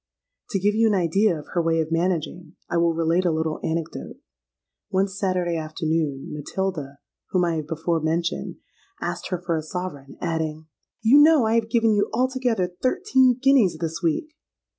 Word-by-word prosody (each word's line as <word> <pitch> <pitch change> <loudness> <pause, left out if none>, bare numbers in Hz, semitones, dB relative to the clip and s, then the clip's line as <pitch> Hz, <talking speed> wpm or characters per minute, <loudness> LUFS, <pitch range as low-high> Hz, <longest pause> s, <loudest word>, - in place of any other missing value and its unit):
To 200 - -1
give 205 +2 +2
you 225 +1 +3
an 210 - +2
idea 185 +1 +2
of 150 - -11
her 175 - +2
way 165 0 +1
of 160 0 -2
managing, 170 -1 -2
I 175 - -1
will 170 -1 +2
relate 165 +2 +2
a 180 - +2
little 160 0 -1
anecdote. 165 0 -4 0.7
One 190 +1 +2
Saturday 185 -3 -1
afternoon, 155 -3 -2
Matilda 150 -2 -4 0.3
(whom 180 -2 +2
I 165 -1 0
have 155 -1 -4
before 165 +1 -1
mentioned) 165 +2 -1 0.4
asked - - -4
her 180 - -2
for 170 -1 -2
a 160 - -1
sovereign; 155 -4 -6
adding, 160 -1 -3 0.4
'You 250 +6 +7
know 305 -5 +6
I 220 - +1
have 230 -1 +1
given 230 -1 +3
you 205 -1 +1
altogether 245 -7 0
thirteen 260 - +3
guineas 255 -11 +4
this 165 +2 -3
week.' 175 - -1
175 Hz, 170 wpm, -24 LUFS, 160-210 Hz, 0.7 s, You